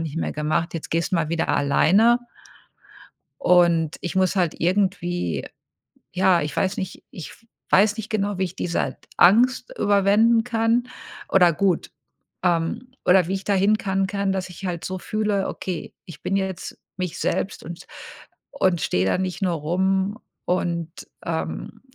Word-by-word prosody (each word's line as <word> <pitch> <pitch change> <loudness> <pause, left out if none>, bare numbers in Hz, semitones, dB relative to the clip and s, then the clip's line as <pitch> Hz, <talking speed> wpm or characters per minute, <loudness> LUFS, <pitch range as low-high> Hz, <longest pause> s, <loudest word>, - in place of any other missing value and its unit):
nicht 160 -1 -5
mehr - - -2
gemacht, 155 +3 -1
jetzt 165 - -6
gehst 165 +3 0
du - - +3
mal 160 -2 0
wieder 165 0 -1
alleine.“ 200 - +4 1.2
Und 170 -3 +3
ich 175 - -4
muss 190 +1 +2
halt 175 -4 +1
irgendwie 180 - 0 0.7
ja, 185 -2 +3
ich 150 - -4
weiß 195 0 0
nicht 190 -1 -5
ich 170 - -9 0.4
weiß 210 +2 +4
nicht 220 +1 -6
genau, 205 -3 -1
wie 190 - +1
ich 180 +1 -8
diese 170 -2 -2 0.2
Angst 245 - +4
überwinden 205 +3 +4
kann 230 +1 +1 0.4
oder 180 -3 +5
gut 190 -1 0 0.5
ähm, 175 +8 0
oder 180 -2 +5
wie 190 - -2
ich 190 - -5
da 205 - +1
hin 200 +3 +3
kann 195 -1 -1
kann, 200 0 -1
dass 190 -1 -3
ich 180 +2 -9
halt 175 -2 -3
so 185 0 -4
fühle: 210 -2 -1
„Okay, 180 -4 -5
ich 175 - -12
bin 195 - 0
jetzt 190 -2 -4 0.2
mich 180 -3 -4
selbst 195 - -2
und 170 +1 -9 0.7
und 185 -10 +1
stehe 90 +1 +1
da 95 - +1
nicht 185 -1 -3
nur 185 -2 +1
rum 190 +6 0 0.3
und, 170 -2 -1 0.4
ähm, 170 +6 -4
185 Hz, 160 wpm, -23 LUFS, 170-200 Hz, 1.2 s, oder